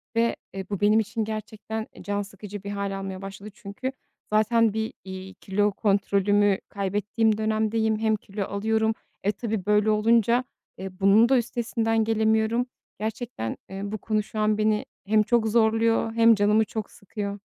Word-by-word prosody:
ve, 230 0 +2 0.2
eee, 195 -1 -5
bu 200 -1 -3
benim 210 +2 +5
için 220 +1 -2
gerçekten, 215 0 -5
eee, - - -11
can 205 0 -1
sıkıcı 200 0 -9
bir 200 - -5
hâl 200 -1 -3
almaya 190 0 -6
başladı. 195 +2 -8
Çünkü 205 +7 -5 0.4
zaten 220 0 +3
bir, 220 0 -2
iii, 190 0 -8
kilo 205 +2 0
kontrolümü 200 0 +2
kaybettiğim 205 +2 0
dönemdeyim. 220 0 +1
Hem 220 -1 +2
kilo 200 0 -5
alıyorum. 220 +2 0 0.3
Eee, 205 - +4
tabii 215 -3 -3
böyle 210 +1 +3
olunca, 230 +3 +3 0.3
eee, 190 0 -5
bunun 205 +4 +5
da 265 - +5
üstesinden 225 -1 0
gelemiyorum. 220 +2 +2 0.3
Gerçekten, 220 - -4
eee, 195 +1 -6
bu 210 +2 -4
konu 215 0 -1
şu 215 - -6
an 215 0 +2
beni 215 0 +1 0.2
hem 215 +1 +4
çok 225 +1 +2
zorluyor 225 0 +2
hem 230 0 +6
canımı 210 +2 +3
çok 215 0 -5
sıkıyor. 200 0 -6
215 Hz, 160 wpm, -25 LUFS, 200-225 Hz, 0.4 s, hem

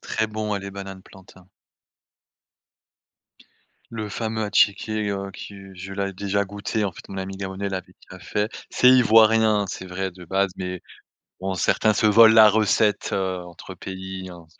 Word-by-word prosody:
Très 110 - -2
bon 110 -1 -3
ouais, 100 - -2
les 100 0 -7
bananes 95 -1 -9
plantain. 95 -2 -18 2.4
Le 110 -2 -5
fameux 110 +1 -3
attiéké, 105 0 +1
heu, 100 0 -4
qui 100 - -10 0.2
je 95 +2 -8
l'avais 100 0 -3
déjà 100 +2 -1
goûté 105 +2 -3
en 95 - -2
fait, - - -13
mon 95 - -7
ami 95 0 -5
gabonais 95 +1 -4
l'avait 95 -2 -6 0.2
déjà - - -10
fait, 105 +2 -2 0.2
c'est 125 - +4
ivoirien 110 -3 +5
c'est 95 - -6
vrai 95 +1 -4
de 90 0 -13
base. 95 +3 0
Mais, 90 -1 -5 0.6
bon, 95 0 -2
certains 105 +3 +2
se 110 - +2
volent 110 +1 +7
la 110 -1 +9
recette, 105 0 +2
heu, 95 -1 -1
entre 90 +2 -11
pays 95 0 -7
hein. 85 -2 -12
100 Hz, 165 wpm, -23 LUFS, 95-110 Hz, 2.4 s, la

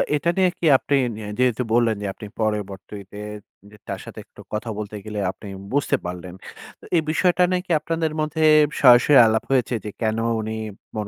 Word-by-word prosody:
এটা 160 +3 0
নিয়ে 185 -1 +4
কি - - -2
আপনি 140 - -1 0.2
নি 110 - -8 0.2
যেহেতু 125 -1 +2
বললেন 115 -2 +3
যে - - -4
আপনি 105 - -10
পরবর্তিতে 105 -2 -4 0.5
যে 105 - -15
তার - - -4
সাথে - - -10
একটু - - -16
কথা 110 +2 -3
বলতে 105 0 -6
গেলে 105 -1 -5
আপনি 105 - -13 0.3
বুঝতে 145 0 +2
পারলেন। 90 0 -6 0.5
তো - - -16
এই 165 - +4
বিষয়টা 180 +2 +2
নাকি 180 0 -2
আপনাদের 160 +1 -2
মধ্যে 155 +1 -1 0.4
সরাসরি 125 +2 +7
আলাপ 110 0 +1
হয়েছে 125 -2 +1
যে, - - -3
কেন 110 -1 0 0.2
উনি 110 0 -4 0.4
মন 105 -1 -3
115 Hz, 180 wpm, -22 LUFS, 105-150 Hz, 0.5 s, সরাসরি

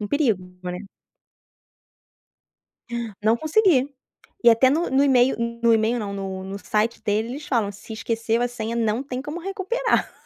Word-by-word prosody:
um 205 - -4
perigo 230 -10 +1 0.2
né. 180 0 -4 2.4
Não 220 +2 +4
consegui 315 - +3 0.6
e 235 - +9
até 230 +3 +5
no 315 +6 +1
no 265 +1 +3
email 260 -2 +4 0.3
no 235 0 +5
email 225 +2 +2
não, 205 -2 -4
no 190 -1 -5
no 195 +1 -6
site 215 +3 -1
deles, 215 +3 0
eles 290 +4 -7
falam: 230 -8 +1
"Se 205 +3 -11
esqueceu 230 +1 -1
a 245 - +1
senha 230 -1 -4
não 225 +1 0
tem 260 -2 -5
como 295 +4 -6
recuperar." 390 +6 -1
235 Hz, 160 wpm, -23 LUFS, 215-280 Hz, 2.4 s, e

